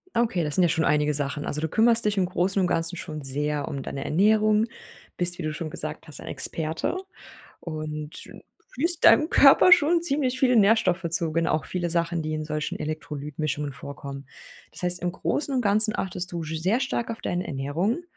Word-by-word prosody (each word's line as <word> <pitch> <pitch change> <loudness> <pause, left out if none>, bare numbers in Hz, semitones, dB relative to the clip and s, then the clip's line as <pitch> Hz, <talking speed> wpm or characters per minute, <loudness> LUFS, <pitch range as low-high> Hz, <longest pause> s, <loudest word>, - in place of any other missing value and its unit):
Okay, 230 -7 +1
das 150 -2 -2
sind 185 - +3
ja 175 - +4
schon 160 0 0
einige 150 0 +2
Sachen. 145 0 -3
Also, 150 - -3
du 160 - -2
kümmerst 230 +4 +3
dich 210 0 0
im 190 -2 +2
Großen 185 +2 0
und 185 - +2
Ganzen 165 0 0
schon 155 -3 -7
sehr 145 +2 -2
um 140 - -5
deine 135 +1 -6
Ernährung, 215 +4 +3 0.5
bist 175 0 -2
wie 180 - -5
du 155 - -2
schon 155 +1 -5
gesagt 155 +1 -7
hast 150 - -7
ein - - -11
Experte 160 - -3 0.6
und 155 -2 -6 0.5
führst 335 +7 0
deinem 310 - +6
Körper 285 +6 +6
schon 340 0 +5
ziemlich 275 -6 0
viele 250 -2 +3
Nährstoffe 200 -5 +3
zu 165 -1 -1
ge 165 +1 0
auch 155 -5 -1
viele 175 -2 -3
Sachen, 170 0 -1
die 155 0 -4
in 155 0 -3
solchen 150 0 -4
Elektrolyt-Mischungen 150 -1 -4
vorkommen. 140 0 -9 0.5
Das - - -11
heißt 180 0 +2
im 175 0 -1
Großen 280 +8 -2
und 255 - +2
Ganzen 210 +1 +6
achtest 180 -1 -3
du 170 -1 -4
sch 160 +1 -5
sehr 200 +9 +1
stark 265 -4 -2
auf 230 - -6
deine 175 +1 -3
Ernährung 160 - -2
170 Hz, 200 wpm, -25 LUFS, 150-215 Hz, 0.6 s, deinem